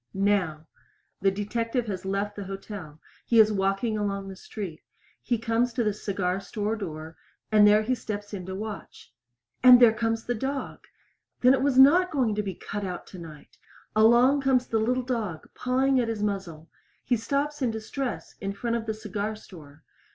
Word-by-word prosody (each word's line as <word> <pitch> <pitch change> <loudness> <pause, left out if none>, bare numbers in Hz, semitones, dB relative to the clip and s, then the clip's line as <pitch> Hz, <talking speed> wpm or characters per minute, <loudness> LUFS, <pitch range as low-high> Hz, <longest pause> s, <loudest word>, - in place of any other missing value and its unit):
Now. 190 -6 0 0.6
The 195 - +4
detective 230 +5 -2
has 190 -4 -5
left 200 +1 -2
the 205 - -6
hotel 195 -5 -8 0.2
he 230 - +3
is 215 0 +7
walking 195 +2 0
along 200 -1 -3
the 190 - -8
street. 185 -4 -7 0.4
He 240 - 0
comes 230 +2 0
to 240 0 0
the 210 -2 +1
cigar 195 -2 -2
store 210 +2 -3
door, 160 -6 -7 0.3
and 210 -1 +6
there 210 +1 +5
steps 205 -4 -5
in 185 -3 -6
to 190 - -5
watch. 210 - -8 0.5
And 250 -1 +9
there 235 -3 +7
comes 225 0 -1
the 245 - 0
dog! 270 +4 -4 0.5
Then 250 +1 +6
it 265 - +1
was 270 -1 +1
not 335 +8 +7
going 255 -7 +1
to 210 - -1
be 195 -3 -5
cut 205 +3 -6
out 180 -2 -5
tonight! 165 -5 -12 0.4
Along 240 +6 +5
comes 260 -2 +2
the 225 - 0
little 250 +3 0
dog 225 -10 -3
pawing 260 +1 +1
at 240 - 0
his 215 -2 -3
muzzle. 185 -6 -4 0.3
He 245 - +1
stops 280 +6 -2
in 255 - +2
distress 230 +4 -5
in 195 0 -3
front 235 +3 -2
of 225 -1 -6
the 220 - -2
cigar 215 0 -4
store. 160 -8 -14
215 Hz, 180 wpm, -26 LUFS, 195-240 Hz, 0.6 s, And